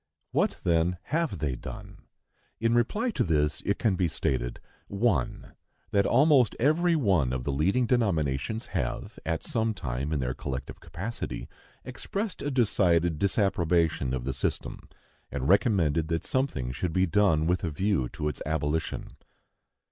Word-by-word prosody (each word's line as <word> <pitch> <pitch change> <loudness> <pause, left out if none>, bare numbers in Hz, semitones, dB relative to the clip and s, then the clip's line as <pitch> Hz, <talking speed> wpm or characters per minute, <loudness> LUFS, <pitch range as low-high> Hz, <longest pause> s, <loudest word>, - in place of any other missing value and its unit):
What, - - +1
then, 85 +1 +2 0.2
have 165 - +1
they 75 -3 -1
done? 100 - -8 0.6
In 115 +1 +2
reply 210 - +1
to - - 0
this, 75 -3 +1
it 100 - +2
can 110 -5 +1
be 90 -1 +1
stated, 60 -5 -2 0.3
1. 100 - -1 0.4
That 100 -1 +3
almost 135 -2 +4
every 165 +7 +3
one 95 - +2
of 65 -1 -2
the 70 - -1
leading 95 - +2
denominations 100 - 0
have, - - -3
at 80 -1 -1
some 115 -7 0
time, 70 -3 -3
in 80 - +1
their 65 -1 -1
collective 65 0 -5
capacity, 85 +8 -5 0.4
expressed 195 - -4
a 145 - -1
decided 90 - +2
disapprobation 90 - +1
of 60 - -4
the 65 +1 -2
system, 65 - -4 0.4
and 65 - -2
recommended 85 - +3
that 80 0 -2
something 105 - -1
should 80 +6 -3
be 95 +1 +3
done 85 -4 +3
with 90 +2 +1
a 85 - 0
view 80 -4 0
to 75 - -2
its 75 - -4
abolition. 80 +1 -2
90 Hz, 150 wpm, -28 LUFS, 75-115 Hz, 0.6 s, almost